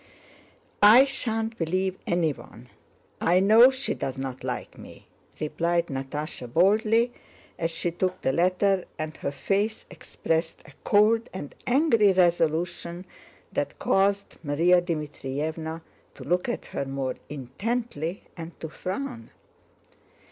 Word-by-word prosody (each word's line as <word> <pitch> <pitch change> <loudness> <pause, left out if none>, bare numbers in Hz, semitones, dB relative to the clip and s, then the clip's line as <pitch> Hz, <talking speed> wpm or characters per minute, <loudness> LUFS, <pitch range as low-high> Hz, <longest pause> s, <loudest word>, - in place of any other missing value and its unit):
"I 225 +6 +9
shan't 225 -4 -2
believe 185 +3 0
anyone, 135 -8 -2 0.5
I 175 +2 +4
know 220 +6 +7
she 265 0 -2
doesn't 135 -1 -5
like - - -4
me," - - -13 0.3
replied 170 +2 0
Natásha 135 -1 -5
boldly 220 - +3 0.5
as 165 - 0
she 170 +1 -2
took 185 +2 -2
the 130 - +1
letter, 185 +3 +2
and 155 0 -4
her - - -3
face 205 +8 -1
expressed 165 -1 -3
a - - -14
cold 220 +2 +3
and 165 -6 -7
angry 240 -7 +4
resolution 175 0 +1 0.5
that - - -2
caused 200 +1 +1
Márya 170 +5 +3
Dmítrievna 160 0 -4 0.3
to 130 - -10
look 180 - 0
at 240 - -3
her 140 - -2
more 135 -1 -3 0.2
intently 165 - -4
and 165 -1 -9
to 160 - -6
frown. 235 - -5
175 Hz, 120 wpm, -26 LUFS, 155-205 Hz, 0.5 s, I